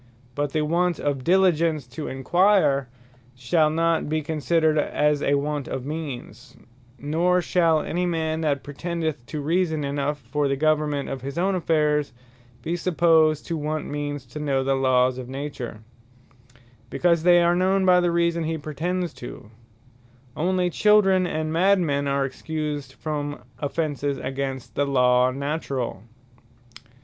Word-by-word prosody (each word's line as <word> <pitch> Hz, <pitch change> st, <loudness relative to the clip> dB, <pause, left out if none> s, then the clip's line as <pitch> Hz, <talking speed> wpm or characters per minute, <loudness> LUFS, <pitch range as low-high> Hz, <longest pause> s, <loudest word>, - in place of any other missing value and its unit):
But 145 Hz, +1 st, -2 dB
the 155 Hz, +1 st, 0 dB
want 170 Hz, +2 st, +1 dB
of 140 Hz, -3 st, -2 dB
diligence 170 Hz, -5 st, +2 dB
to 145 Hz, +5 st, -6 dB
enquire, 145 Hz, -1 st, +2 dB, 0.5 s
shall 155 Hz, +5 st, +2 dB
not 165 Hz, -1 st, 0 dB
be 155 Hz, 0 st, -1 dB
considered 155 Hz, +1 st, +1 dB
as 150 Hz, 0 st, +1 dB
a 140 Hz, -, +2 dB
want 145 Hz, 0 st, -2 dB
of 130 Hz, -1 st, -5 dB
means; 140 Hz, -7 st, -7 dB, 0.4 s
Nor 165 Hz, +7 st, +1 dB
shall 165 Hz, -3 st, +2 dB
any 180 Hz, +2 st, -1 dB
man, 160 Hz, -2 st, -1 dB
that 145 Hz, -4 st, 0 dB
pretendeth 160 Hz, -1 st, -4 dB
to 155 Hz, -, -5 dB
reason 160 Hz, 0 st, 0 dB
enough 140 Hz, +1 st, -2 dB
for 145 Hz, +3 st, -2 dB
the 140 Hz, -, 0 dB
Government 150 Hz, -1 st, 0 dB
of 135 Hz, -, -5 dB
his 140 Hz, +3 st, -6 dB
own 190 Hz, +3 st, +1 dB
affairs, 150 Hz, -6 st, +1 dB, 0.5 s
be 170 Hz, -, -1 dB
supposed 165 Hz, -3 st, +3 dB
to 170 Hz, -, -3 dB
want 155 Hz, 0 st, -3 dB
means 145 Hz, -2 st, -4 dB
to 120 Hz, +5 st, -9 dB
know 140 Hz, -3 st, 0 dB
the 135 Hz, +1 st, +1 dB
Lawes 130 Hz, -1 st, +2 dB
of 125 Hz, -1 st, -8 dB
Nature; 135 Hz, -5 st, -6 dB, 1.1 s
because 170 Hz, +2 st, +2 dB
they 175 Hz, 0 st, +5 dB
are 170 Hz, 0 st, +3 dB
known 190 Hz, +1 st, +2 dB
by 180 Hz, -1 st, +6 dB
the 175 Hz, -1 st, +2 dB
reason 170 Hz, -1 st, +1 dB
he 160 Hz, +1 st, -2 dB
pretends 170 Hz, +4 st, -3 dB
to: 110 Hz, -3 st, -10 dB, 0.8 s
only 180 Hz, +1 st, 0 dB
Children, 195 Hz, -2 st, +4 dB
and 155 Hz, -1 st, -2 dB
Madmen 165 Hz, -6 st, +2 dB
are 140 Hz, 0 st, +1 dB
Excused 145 Hz, 0 st, -4 dB
from 145 Hz, -2 st, -4 dB, 0.2 s
offences 145 Hz, -2 st, -2 dB
against 135 Hz, -1 st, -4 dB
the 145 Hz, -, 0 dB
Law 125 Hz, -2 st, +3 dB
Naturall. 140 Hz, -5 st, -3 dB
150 Hz, 145 wpm, -24 LUFS, 140-170 Hz, 1.1 s, by